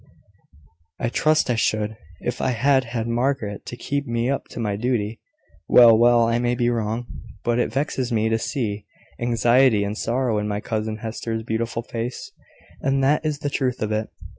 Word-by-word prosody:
"I 115 Hz, -, 0 dB
trust 155 Hz, +1 st, +2 dB
I -, -, +1 dB
should, 110 Hz, -1 st, 0 dB, 0.3 s
if 120 Hz, 0 st, -3 dB
I 130 Hz, -, +1 dB
had 130 Hz, +2 st, +3 dB
had 115 Hz, -1 st, -3 dB
Margaret 120 Hz, -3 st, -1 dB
to 120 Hz, -, -6 dB
keep 140 Hz, +3 st, -3 dB
me 120 Hz, +2 st, 0 dB
up 140 Hz, -, -2 dB
to -, -, -9 dB
my 105 Hz, -3 st, -1 dB
duty." 115 Hz, -1 st, -1 dB, 0.5 s
"Well, 120 Hz, -2 st, +8 dB
well; 120 Hz, +1 st, +5 dB
I 115 Hz, +1 st, +1 dB
may 120 Hz, 0 st, +1 dB
be 120 Hz, 0 st, +1 dB
wrong; 115 Hz, +1 st, -2 dB, 0.4 s
but 120 Hz, 0 st, +1 dB
it 120 Hz, -, 0 dB
vexes 130 Hz, -1 st, -1 dB
me 110 Hz, -1 st, +1 dB
to 115 Hz, 0 st, +1 dB
see 105 Hz, -5 st, -3 dB, 0.3 s
anxiety 120 Hz, -1 st, +3 dB
and 100 Hz, +1 st, -3 dB
sorrow 120 Hz, -1 st, 0 dB
in 105 Hz, -, -2 dB
my 105 Hz, 0 st, -2 dB
cousin 110 Hz, 0 st, -3 dB
Hester's 110 Hz, 0 st, -3 dB
beautiful 115 Hz, +1 st, -2 dB
face; 120 Hz, +1 st, -5 dB, 0.5 s
and 135 Hz, 0 st, +1 dB
that 145 Hz, +4 st, +3 dB
is 150 Hz, -2 st, -2 dB
the 145 Hz, -, -1 dB
truth 130 Hz, -3 st, -1 dB
of 110 Hz, -, -2 dB
it. 110 Hz, 0 st, -1 dB
120 Hz, 185 wpm, -23 LUFS, 110-130 Hz, 0.5 s, Well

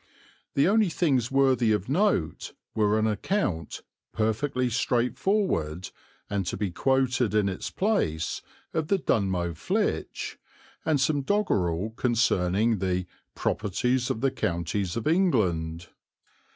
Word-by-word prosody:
The 140 Hz, -, +4 dB
only 210 Hz, -1 st, +4 dB
things 135 Hz, -8 st, +1 dB
worthy 130 Hz, -4 st, +3 dB
of 105 Hz, -2 st, 0 dB
note 145 Hz, -, 0 dB, 0.2 s
were 105 Hz, 0 st, +2 dB
an 110 Hz, -, +2 dB
account, 105 Hz, -, -1 dB, 0.3 s
perfectly 125 Hz, +4 st, 0 dB
straightforward, 120 Hz, -, 0 dB, 0.4 s
and 100 Hz, -1 st, -1 dB
to -, -, -2 dB
be 100 Hz, -2 st, -2 dB
quoted 125 Hz, 0 st, +1 dB
in 105 Hz, -2 st, +3 dB
its 95 Hz, -1 st, -3 dB
place, 90 Hz, -, 0 dB, 0.3 s
of 160 Hz, -2 st, -1 dB
the 200 Hz, -, +3 dB
Dunmow 95 Hz, -, 0 dB
Flitch, 80 Hz, -, -2 dB, 0.4 s
and 155 Hz, -3 st, +2 dB
some 140 Hz, +2 st, +2 dB
doggerel 105 Hz, -, 0 dB
concerning 110 Hz, -3 st, +1 dB
the 90 Hz, -1 st, -1 dB, 0.3 s
"properties 125 Hz, +5 st, 0 dB
of 110 Hz, -, -2 dB
the 135 Hz, -1 st, +2 dB
counties 85 Hz, +2 st, -2 dB
of 115 Hz, -, -3 dB
England." 95 Hz, -, +1 dB
115 Hz, 120 wpm, -27 LUFS, 95-140 Hz, 0.4 s, The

